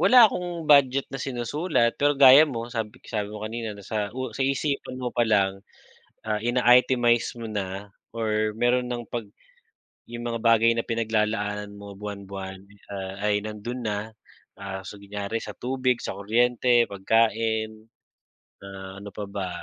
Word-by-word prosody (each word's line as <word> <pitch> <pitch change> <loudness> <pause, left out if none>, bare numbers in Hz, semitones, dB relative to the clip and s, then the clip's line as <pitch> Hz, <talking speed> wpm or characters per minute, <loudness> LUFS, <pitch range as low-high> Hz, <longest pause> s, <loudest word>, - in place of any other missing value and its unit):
wala 250 -2 +8
akong 175 -5 -1
budget 140 -2 +5
na 135 - -4
sinusulat. 125 +1 0
Pero 145 0 +4
gaya 140 +3 +9
mo 115 -3 -4
sabi 110 0 -4
sabi 105 -3 -3
mo 105 0 -8
kanina 110 -1 -4
na 100 - -11
sa 105 -1 -2
u 130 0 -4
sa - - -8
isipan 140 -1 -2
mo 125 -1 -2
palang, 100 -5 +2 0.6
ah, 110 -1 -1
ina-itemize 120 0 +3
mo 115 - -7
na 100 -1 -4 0.2
or 110 -1 0
meron 125 +1 +2
ng 120 -1 -4
'pag 115 -3 -4 0.8
yung 120 0 -7
mga 115 -1 -3
bagay 115 0 +5
na 115 - 0
pinaglalaanan 105 -2 -1
mo 100 0 -10
buwan-buwan 100 -1 -7 0.6
ay 105 0 +2
nandun 110 +3 -5
na, 105 +1 -3 0.4
ah, 95 -1 -5
kunyari 100 +1 -5
sa - - -7
tubig, 130 -1 -1
sa - - -4
kuryente, 120 +3 +3
pagkain, 110 +1 0 0.8
ah, 95 0 -9
ano 100 - -8
pa 105 +2 -7
ba, 100 -2 -4
115 Hz, 145 wpm, -25 LUFS, 105-125 Hz, 0.8 s, gaya